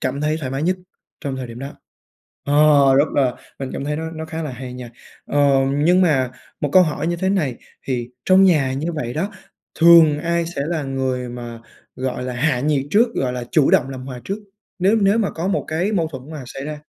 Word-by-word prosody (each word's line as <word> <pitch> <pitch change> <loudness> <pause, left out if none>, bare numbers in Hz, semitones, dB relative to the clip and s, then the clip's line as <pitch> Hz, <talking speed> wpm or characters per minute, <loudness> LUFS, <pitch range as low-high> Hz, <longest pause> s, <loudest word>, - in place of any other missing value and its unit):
cảm 130 +2 -2
thấy 155 +1 0
thoải 130 -5 -4
mái 135 +3 -3
nhất 185 +2 +1 0.4
trong 135 -2 -4
thời 130 - -5
điểm 115 0 -9
đó. 135 +2 -7 0.7
Ờ, 145 - -1 0.4
rất 140 +3 +5
là 130 -4 +2 0.2
mình 135 -1 -4
cảm - - -4
thấy 150 +1 -1
nó 160 0 -4
nó 160 -1 -6
khá 160 0 -5
là 150 - -4
hay 125 0 -8
nha. 125 -2 -8 0.3
Ờ, 145 - -1 0.4
nhưng 175 +5 +4
mà 135 -8 +2 0.3
một 145 - 0
câu 185 - +8
hỏi 155 -1 -2
như 175 - 0
thế 190 +2 -1
này 155 -11 0 0.3
thì 120 -2 -2 0.2
trong 190 +1 +6
nhà 150 -8 +3
như 145 +5 -3
vậy 120 -6 -4
đó, 190 - -2 0.5
thường 165 -3 +7
ai 170 +1 0
sẽ 165 -4 -4
là 160 -1 -2
người 130 -2 -2
mà, 120 -1 -7 0.4
gọi 130 -1 -3
là, 125 - -4
hạ 130 +1 +1
nhiệt 140 0 0
trước, 225 +4 +5
gọi 125 -2 -1
là, 125 -1 -4
chủ 150 -4 +3
động 130 - +3
làm 130 -1 -7
hòa 125 -2 -7
trước, 195 +2 -3 0.4
nếu 195 +4 +3
nếu 200 +3 +4
mà 210 -3 0
có 165 +3 -3
một 195 - -1
cái 170 +6 -1
mâu 170 -6 +1
thuẫn 135 0 -9
mà 150 -4 -7
xảy 135 +2 -7
ra? 150 0 -5
145 Hz, 230 wpm, -20 LUFS, 130-170 Hz, 0.7 s, câu